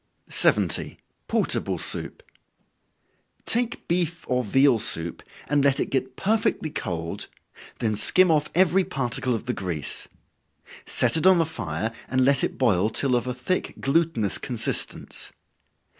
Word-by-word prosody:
70. - - +2 0.3
Portable - - -1
Soup. 485 - -4 1.2
Take 240 0 0
beef 170 -1 -1
or 125 0 0
veal 135 +2 +3
soup, 85 -6 0 0.3
and 145 -1 +2
let 140 -1 +2
it - - -2
get 130 -1 -2
perfectly 205 -5 0
cold, 85 - -4 0.5
then 110 -2 -1
skim 185 - +5
off 150 -1 +1
every 185 +1 +4
particle 125 -4 -1
of 115 - -5
the 125 +1 -2
grease. 85 -9 -4 0.8
Set - - +3
it 160 - +2
on 190 -1 +6
the 165 - +2
fire, 105 - -4 0.2
and 130 0 +1
let 140 -1 +3
it - - -2
boil 105 -5 +2
till 125 +3 +1
of 120 +1 -1
a 125 - -2
thick 155 +9 -2
glutinous 145 - 0
consistence. 120 -3 -2
130 Hz, 140 wpm, -24 LUFS, 110-165 Hz, 1.2 s, on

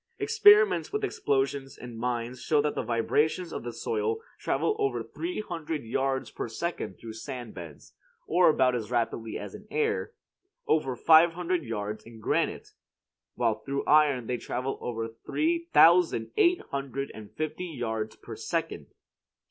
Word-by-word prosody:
Experiments 420 0 +5
with 425 0 -2
explosions 135 - -1
in 120 -2 -9
mines 120 +1 -3
show 150 - +2
that 150 0 +1
vibrations 150 +9 0
of - - -4
the 120 - -5
soil 440 - -2 0.2
travel 430 - 0
over 410 -1 0
three 345 -7 -4
hundred 165 - -4
yards 130 +3 -1
per - - -4
second 170 +10 -4
through 115 -1 -9
sand 120 0 -7
beds, 85 -5 -11 0.3
or 175 +1 +4
about 130 -4 +3
as 115 -3 -3
rapidly 115 -2 -1
as - - -7
in 210 - -11
the - - -15
air; 445 0 0 0.5
over 135 -5 +1
five 165 +5 +6
hundred 180 0 -1
yards 105 -4 -4
in 115 0 -13
granite; 105 - -1 0.7
while 115 -3 +1
through 140 +4 -3
iron 145 -5 +4
they 125 +1 -2
travel 130 +3 -4
over 115 -2 -3
three 330 - -2
thousand 165 -10 +5
eight 350 +1 +4
hundred 140 0 -3
and 105 -2 -10
fifty 155 +3 -3
yards 110 -7 -3
per - - -9
second. - - -3
135 Hz, 155 wpm, -28 LUFS, 115-175 Hz, 0.7 s, five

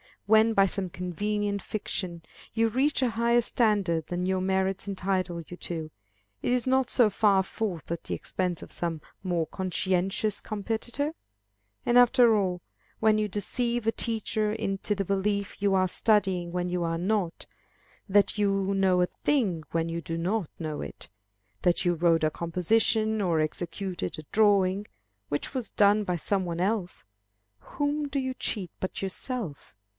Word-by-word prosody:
When 220 +2 +5
by 195 -2 +5
some 195 -1 -2
convenient 200 +3 -2
fiction 180 -5 -4 0.3
you 225 0 +2
reach 270 +5 +1
a 250 -2 +2
higher 235 +2 +3
standard 205 -9 +1
than 180 +1 -2
your 190 0 +1
merits 190 +1 0
entitle 185 -3 -1
you 175 - -10
to, 160 -3 -5 0.5
is 245 -1 +1
it - - 0
not 260 -1 +2
so 240 -4 +4
far 200 -1 +3
forth 190 -5 -4
at 170 -1 -4
the - - -2
expense 180 -3 -3
of - - -12
some 165 -3 -2 0.2
more 175 -3 0
conscientious 190 +4 0
competitor? 230 +8 -3 0.7
And, 240 - +4
after 245 -2 +6
all, 185 -4 0 0.4
when 220 -1 +4
you 215 0 +1
deceive 235 +3 -1
a 225 - +3
teacher 220 -2 -1
into 210 -1 -2
the 200 - -1
belief 200 +1 -1
that - - -28
you 200 -1 +3
are 185 0 +3
studying 190 -5 +2
when 180 0 -1
you 180 0 -1
are 165 0 -1
not, 185 -1 -1 0.6
that 205 +1 +3
you 195 -1 +1
know 190 -2 +3
a - - +5
thing 195 - 0
when 165 0 0
you 170 0 -3
do 165 0 -4
not 185 +1 -1
know 155 -3 -4
it, - - -8 0.5
that 175 -1 +2
you 175 - +3
wrote 165 -1 +2
a 155 - +3
composition, 215 +6 +1
or 170 -5 +2
executed 175 - -3
a 155 - -7
drawing, 200 -2 +3 0.4
which 145 - -3
was 255 -4 -2
done 205 +1 +4
by 180 - 0
some 190 +3 0
one 170 0 -3
else, 195 -2 -1 0.6
whom 290 - -2
do 280 - -3
you 260 -1 -1
cheat 195 -8 -3
but 185 - -4
yourself? 195 - -4
195 Hz, 165 wpm, -28 LUFS, 175-220 Hz, 0.7 s, after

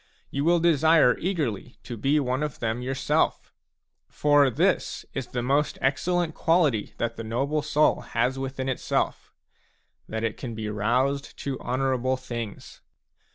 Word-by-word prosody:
You 140 - -1
will 170 +2 +4
desire 160 -5 +5
eagerly 145 - -2
to 120 - -6
be 135 +7 +2
one 130 0 -1
of 150 -2 -3
them 115 +1 -2
yourself. 130 +1 0 0.6
For 145 -2 +4
this 120 - 0
is 135 -3 -4
the 120 -1 -3
most 140 +4 +1
excellent 170 +5 0
quality 155 - +1
that 115 0 -2
the 115 - -5
noble 135 +7 -1
soul 150 +1 +2
has 125 +3 -1
within 135 0 -4
itself, 130 - -1 0.8
that 110 0 -3
it 115 -2 -2
can 120 -3 -6
be 110 -1 -4
roused 125 +7 0
to 135 -2 -3
honourable 130 0 0
things. 120 -5 -7
130 Hz, 145 wpm, -26 LUFS, 120-150 Hz, 0.8 s, desire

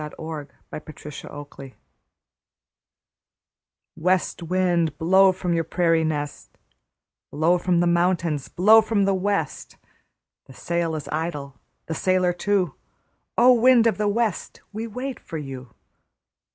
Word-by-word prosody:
THE 150 0 -6
SONG 160 -3 -6 0.2
MY - - -5
PADDLE 150 -1 -11 0.3
SINGS 135 -2 -11 2.2
West 180 +2 0
wind, 170 -3 0
blow 190 +3 +5
from 180 -1 -3
your 165 -1 +1
prairie 165 0 +1
nest, 150 -2 -4 0.7
Blow 165 +4 +2
from 175 -1 +1
the - - +2
mountains, 170 -4 +1
blow 215 +5 +6
from 215 -2 0
the 195 - +2
west. 190 -5 -2 0.7
The 130 - -14
sail 170 -1 -2
is 150 -2 -6
idle, 150 -3 -4 0.3
the 160 - -4
sailor 185 +1 +1
too; 185 -3 0 0.6
O! 250 +2 +7
wind 245 0 +5
of 225 -2 +1
the 210 - +1
west, 215 -2 -2
we 220 +2 -4
wait 255 +4 -5
for 165 - -7
you. 135 -5 -8
175 Hz, 130 wpm, -23 LUFS, 155-195 Hz, 2.2 s, O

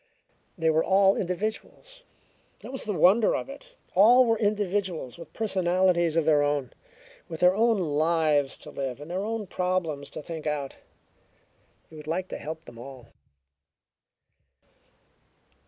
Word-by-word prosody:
They 160 -1 +2
were 160 +1 +2
all 195 0 +4
individuals; 215 - -5 0.6
that - - -9
was 265 - -3
the 210 - -2
wonder 195 +6 +4
of - - -4
it! - - -12 0.2
All 235 +7 +6
were 225 -2 +1
individuals 200 - -1
with 170 - -11
personalities 180 -5 +1
of 165 - +2
their 150 -2 +4
own, 145 -3 -1 0.6
with 160 -1 -7
their 180 +1 +6
own 225 +1 +3
lives 155 -3 +1
to - - -9
live 135 -2 -4
and 150 +3 -9
their 185 +2 -2
own 220 0 -3
problems 180 -6 -2
to - - -7
think 160 -1 -6
out. 145 -2 -3 1.1
He 160 - -16
would 150 0 -11
like 180 +4 -2
to - - -6
help 160 +2 -7
them 115 - -13
all. 130 -1 -11
175 Hz, 145 wpm, -26 LUFS, 155-205 Hz, 1.1 s, All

